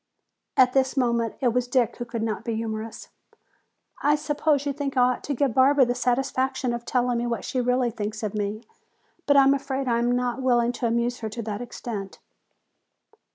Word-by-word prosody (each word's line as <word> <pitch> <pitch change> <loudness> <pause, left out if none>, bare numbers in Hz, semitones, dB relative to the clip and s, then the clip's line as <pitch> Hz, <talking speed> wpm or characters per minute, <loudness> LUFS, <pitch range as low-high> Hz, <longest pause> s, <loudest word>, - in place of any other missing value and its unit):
At 255 -1 +5
this 265 0 +1
moment 235 -3 +1
it 250 - +3
was 250 +1 0
Dick 245 -2 +1
who 240 - -5
would 230 -2 -2
not 220 -1 -2
be 230 -2 -2
humorous. 220 0 -5 0.9
"I 295 +1 +4
suppose 295 -1 0
you 285 - -1
think 275 -1 -4
I 250 0 +5
ought - - -10
to 285 - -2
give 265 -1 +1
Barbara 265 +2 +5
the 245 - 0
satisfaction 255 0 0
of 235 0 -5
telling 245 -1 +1
me 240 - -1
what 235 -4 -3
she 255 - -1
really 250 0 +1
thinks 215 0 -5
of 210 -1 -2
me. 210 +1 -3 0.6
But 285 -1 +5
I 275 - +8
am 270 +1 +5
afraid 275 -1 -2
I 235 -1 +2
am 240 +1 +1
not 250 +1 -1
willing 240 -2 +2
to 245 -1 -2
amuse 235 +1 0
her 220 - -4
to 230 +2 -6
that 210 +1 -4
extent." 220 -5 -6
245 Hz, 200 wpm, -25 LUFS, 230-265 Hz, 0.9 s, I